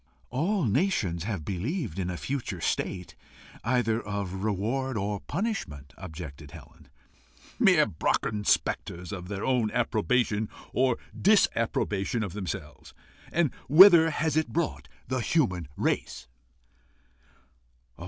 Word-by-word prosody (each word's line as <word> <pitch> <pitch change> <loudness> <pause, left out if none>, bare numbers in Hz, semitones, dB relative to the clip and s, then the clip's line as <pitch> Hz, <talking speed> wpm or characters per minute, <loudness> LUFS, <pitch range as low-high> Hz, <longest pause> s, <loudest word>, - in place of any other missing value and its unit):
"All 170 - 0
nations 105 - 0
have 100 -9 -3
believed 110 - -3
in 90 -1 -2
a 90 - -4
future 120 -8 -4
state, 90 +2 -2 0.5
either 115 -2 +1
of 100 -2 -4
reward 115 +5 -1
or 100 0 -2
punishment," 130 - -4
objected 80 -5 -9
Helen. 75 +1 -14 0.7
"Mere - - +6
Brocken 105 +6 -1
spectres 90 -3 0
of 90 -3 -6
their 100 +1 -4
own 125 -4 +2
approbation 115 -2 0 0.2
or 130 -2 +2 0.2
disapprobation 115 - +2
of 95 -5 -5
themselves. 75 -7 -6 0.4
And 165 -5 +1 0.2
whither 170 +1 +9
has 155 0 -1
it 160 0 +2
brought 170 0 -2 0.2
the 125 - 0
race?" 65 - -2
105 Hz, 110 wpm, -28 LUFS, 90-135 Hz, 0.7 s, whither